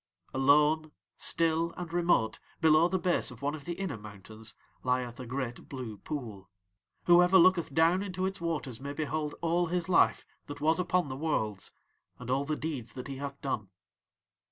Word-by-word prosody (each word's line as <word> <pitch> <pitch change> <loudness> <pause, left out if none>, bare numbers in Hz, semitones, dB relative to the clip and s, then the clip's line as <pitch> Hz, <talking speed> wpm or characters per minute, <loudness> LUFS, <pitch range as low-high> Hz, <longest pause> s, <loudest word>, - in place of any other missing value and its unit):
"'Alone, 150 +3 +4 0.2
still 165 0 +1
and 175 -2 -6
remote 170 -11 +2 0.2
below 160 0 +5
the 190 - 0
base 180 -1 +1
of 125 +1 -11
one 145 +1 0
of 155 -3 -8
the 175 - -2
inner 185 - -4
mountains, 110 +2 -9 0.3
lieth 125 -1 -1
a 125 - -7
great 125 -1 -4
blue 125 -6 -6
pool. 110 -11 -6 0.6
"'Whoever 175 +2 +7
looketh 175 -3 +5
down 165 +5 +4
into 185 -2 -2
its 190 -2 -3
waters 150 -8 -3
may 140 +1 -5
behold 150 0 -2
all 170 +1 +1
his 175 0 -1
life 180 - +3 0.2
that 145 -1 -7
was 160 +3 +2
upon 180 -2 +1
the 130 - -5
Worlds 110 -10 -1 0.5
and 125 0 -6
all 135 +2 +1
the 155 +1 -1
deeds 150 -7 -5
that 125 - -7
he 135 -1 -6
hath 140 0 -6
done. 110 -8 -3
150 Hz, 175 wpm, -30 LUFS, 125-170 Hz, 0.6 s, Whoever